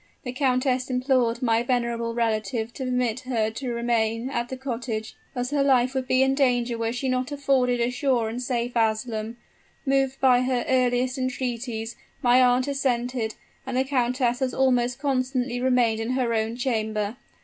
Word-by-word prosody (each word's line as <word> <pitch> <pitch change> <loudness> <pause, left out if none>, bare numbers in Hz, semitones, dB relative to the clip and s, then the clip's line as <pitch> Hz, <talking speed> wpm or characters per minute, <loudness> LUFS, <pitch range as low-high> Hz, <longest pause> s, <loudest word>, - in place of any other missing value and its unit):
The 250 - -4
countess 255 -1 +1
implored 250 -2 +1
my 230 -1 +3
venerable 235 -2 -1
relative 225 0 -1
to 265 - -5
permit 250 -2 0
her 230 -4 -1
to 245 +5 -7
retrain 235 0 0
at 240 -1 -2
the 260 - -5
cottage, 235 -4 -4 0.2
as 250 +1 -2
her 290 -1 +2
life 260 -2 +3
would 260 -1 -2
be 255 0 +4
in 265 0 +2
danger 245 -3 +1
were 230 0 -1
she 250 +2 -3
not 255 +1 -1
afforded 270 -4 +1
a 235 +1 +1
sure 250 -3 +1
and 230 +3 -4
safe 245 -1 -2
asylum. 220 0 -1 0.5
Moved 270 -1 +1
by 250 -2 +5
her 255 -1 0
earnest 255 0 +1
entreaties, 240 -3 -3 0.3
my 245 +1 +5
aunt 250 +1 +3
assented; 250 -4 -1 0.3
and 260 -1 -3
the 260 - +3
countess 250 -2 0
has 260 -2 -1
almost 250 -2 +2
constantly 255 -2 -1
remained 245 -3 +2
in 225 +3 -2
her 250 -3 0
own 220 +1 -1
chamber. 220 -3 -1
250 Hz, 170 wpm, -25 LUFS, 235-260 Hz, 0.5 s, by